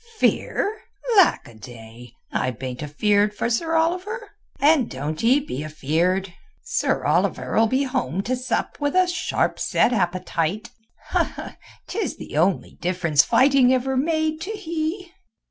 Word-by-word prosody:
"Fear? 430 0 0 0.4
Lackaday! 120 - 0 0.2
I 130 - 0
bain't 125 +1 -6
afeeard 205 +8 +1
for 235 - -1
Sir 325 +8 0
Oliver, 365 +8 -1 0.3
and 290 -3 +4
doan't 150 +6 -4
ee 255 +5 +5
be 150 - -5
afeeard. 170 +5 -1 0.3
Sir 485 - -1
Oliver'll 225 0 +2
be 260 +5 +1
home 255 - -2
to 255 +5 -1
sup 250 0 -3
with 290 +1 -1
a 370 0 +5
sharp 345 -1 -1
set 245 - +2
appetite—'tis 205 - -3
the - - -9
only 175 +5 0
difference 170 -5 +2
fighting 265 - +4
ever 260 +1 +1
made 315 +2 0
to 370 - -5
he." 335 -1 -4
235 Hz, 125 wpm, -23 LUFS, -, 0.4 s, ee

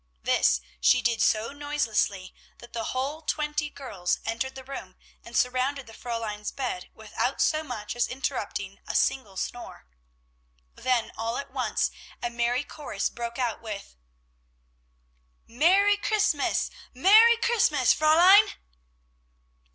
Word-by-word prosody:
This 60 -1 +3 0.2
she 60 +1 +4
did 235 0 +1
so 220 +3 +2
noiselessly, 235 -10 -1 0.2
that 240 - -15
the 230 -1 -3
whole 275 +5 -3
twenty 300 -1 -2
girls 200 -12 -3
entered 235 +4 -3
the 265 - -8
room 270 +1 -8 0.3
and 235 - -5
surrounded 255 +2 0
the 225 - -13
Fräulein's 220 -3 -4
bed 360 +8 -4
without - - -3
so 310 -1 +2
much 235 -7 -6
as 240 - +1
interrupting 230 -7 -4
a - - -4
single 210 -8 0
snore. 240 - -6 0.9
Then 250 -3 0
all 230 +1 -3
at 280 - -6
once - - 0 0.3
a 240 - -3
merry 240 +3 0
chorus 300 0 -4
broke 235 0 -6
out 245 -4 -2
with, 210 - -7 1.5
"Merry 385 - +4
Christmas! 410 -6 +1 0.2
Merry 435 - +7
Christmas, 475 0 +3
Fräulein!" 340 +6 +6
255 Hz, 125 wpm, -27 LUFS, 230-300 Hz, 1.5 s, Merry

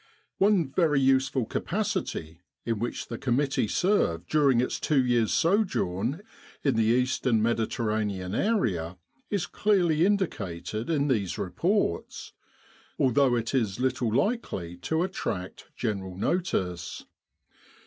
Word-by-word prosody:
One 190 -8 +3
very 155 -3 +2
useful 135 -1 +2
capacity 80 -5 -3 0.2
in 115 -3 -1
which 120 +2 -3
the 115 - -6
committee 135 -1 +1
served 105 - +1
during 140 -5 +4
its 125 - -1
two 135 -4 +2
years' 120 -3 +2
sojourn 160 - +1 0.4
in 140 -5 +2
the 110 0 +2
Eastern 125 0 +2
Mediterranean 110 -4 -1
area 95 - 0 0.3
is 200 -5 0
clearly 175 -7 +2
indicated 110 - -1
in 145 -3 +1
these 105 -9 0
re 90 - -4
ports, 175 - -1 0.6
although 130 0 +3
it 115 +1 -2
is 115 -6 0
little 125 -3 0
likely 110 - -1
to 160 - -1
attract 95 - -4
general 95 -5 -3
notice. 95 - -2
125 Hz, 120 wpm, -27 LUFS, 100-160 Hz, 0.6 s, during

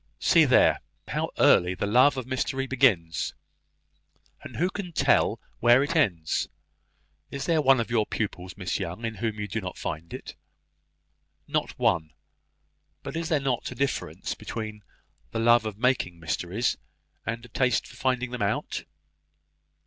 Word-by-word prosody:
See - - +5
there, - - +5 0.3
how - - -1
early 90 +1 +5
the 90 - -2
love 125 +7 +5
of 130 - -3
mystery 130 +1 -1
begins! 110 -12 +2 1.1
and - - -10
who 180 +3 +1
can 195 -4 -6
tell - - +3 0.2
where 120 +3 +6
it 165 +4 -2
ends? 90 - +1 0.8
Is 140 - -4
there 165 -2 +2
one 135 -2 +5
of 115 0 -2
your 110 -3 +2
pupils, 95 -4 -4
Miss 90 -1 -2
Young, 95 +5 -4
in 115 - -2
whom 110 -1 -3
you 105 - -3
do 110 +1 -3
not 90 -2 -6
find 80 +2 -5
it?" - - -7 1.1
"Not - - -2
one; 80 -2 +1 0.9
but - - -6
is 165 0 -2
there 155 -4 +3
not 135 -3 -1
a - - -8
wide - - -16
difference 140 -1 -2
between 110 -2 -6 0.5
the 115 - -3
love 120 0 +4
of 105 -2 -6
making 115 -8 +1
mysteries, 90 +8 -1 0.5
and 115 +1 -3
a - - -14
taste 125 +2 +1
for - - -13
finding 125 -1 0
them 125 -2 -5
out?" 100 - -1
115 Hz, 160 wpm, -27 LUFS, 100-130 Hz, 1.1 s, where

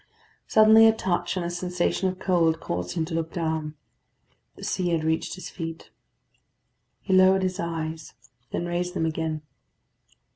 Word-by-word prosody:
Suddenly 220 +1 +7
a 225 - +5
touch 180 -3 -1
and 175 - -2
a 170 - -3
sensation 180 +1 -1
of 185 - -6
cold 165 -4 +2
caused 90 - -4
him 160 - 0
to 165 - -7
look 165 0 -2
down. 160 -3 -2 0.8
The - - -12
sea 180 -1 -1
had 165 -2 0
reached 160 +3 -1
his 185 - -8
feet. 165 -2 -7 1.1
He 190 - -1
lowered 190 0 +5
his 185 +1 -2
eyes, 160 - -4 0.3
then 175 - -3
raised 175 +1 -2
them 160 - 0
again. 160 -1 -2
175 Hz, 155 wpm, -25 LUFS, 160-185 Hz, 1.1 s, Suddenly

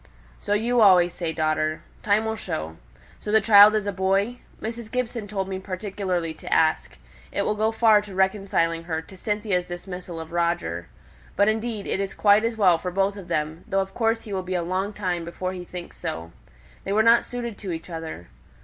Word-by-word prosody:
"So 205 - -1
you 235 +3 +2
always 180 -4 +6
say, 170 -2 -3
daughter. 155 0 -1 0.2
Time 210 +1 +2
will 220 0 -1
show. 80 - -5 0.4
So 210 - -5
the 220 - +6
child 210 0 +8
is 215 -2 0
a 205 - -1
boy? 195 +5 0 0.2
Mrs. 230 0 -6
Gibson 240 -4 -2
told 195 -2 -3
me 190 -1 -4
particularly 185 -3 -3
to - - -10
ask. 160 0 +2 0.3
It - - -1
will - - +1
go 215 +1 +1
far 225 -2 +5
to 205 -2 -10
reconciling 190 -4 +1
her 160 -2 -2
to 190 - -14
Cynthia's 205 -2 -1
dismissal 180 -1 -7
of 160 0 -8
Roger. 170 - -1 0.5
But 200 +1 +4
indeed 220 -1 -2
it - - -1
is 195 -1 -3
quite 205 +1 +5
as 230 0 -1
well 180 -6 +4
for 180 - -3
both 195 +2 0
of 195 -4 -9
them, 155 +2 -2
though 195 - +1
of 195 0 -3
course 225 0 +1
he 210 - -8
will 190 - -1
be 185 0 -4
a 175 - 0
long 185 +4 -1
time 180 -4 -2
before 185 +2 -4
he 180 -1 -6
thinks 175 0 -9
so. 80 +1 -5 0.5
They 195 - -2
were 215 +1 +4
not 230 +1 +6
suited 240 -3 -5
to 195 -4 -5
each 165 -1 -5
other. 160 - -7
195 Hz, 205 wpm, -24 LUFS, 175-215 Hz, 0.5 s, child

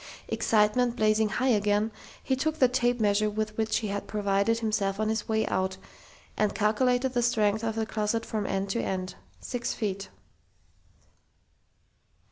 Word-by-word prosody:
Excitement 230 +3 +2
blazing 215 -1 +2
high 255 +5 0
again, 210 -1 +2 0.3
he 265 - +1
took 310 +4 -1
the 255 - +5
tape 245 -1 +1
measure 210 0 +2
with 215 0 -3
which 220 0 0
he 215 - -3
had 200 0 -4
provided 200 +1 +1
himself 210 -3 -1
on 215 0 +1
his 220 0 -2
way 220 0 +1
out, 190 0 -1 0.6
and 210 -1 0
calculated 245 +4 +2
the 240 -1 +2
length 210 +1 +2
of 225 -1 -1
the 225 -1 -1
closet 220 +1 -1
from 210 -2 -3
end 195 0 -1
to 235 - 0
end. 185 -1 -3 0.3
Six 245 -1 -3
feet.... 195 -3 -3
215 Hz, 155 wpm, -28 LUFS, 205-235 Hz, 0.6 s, the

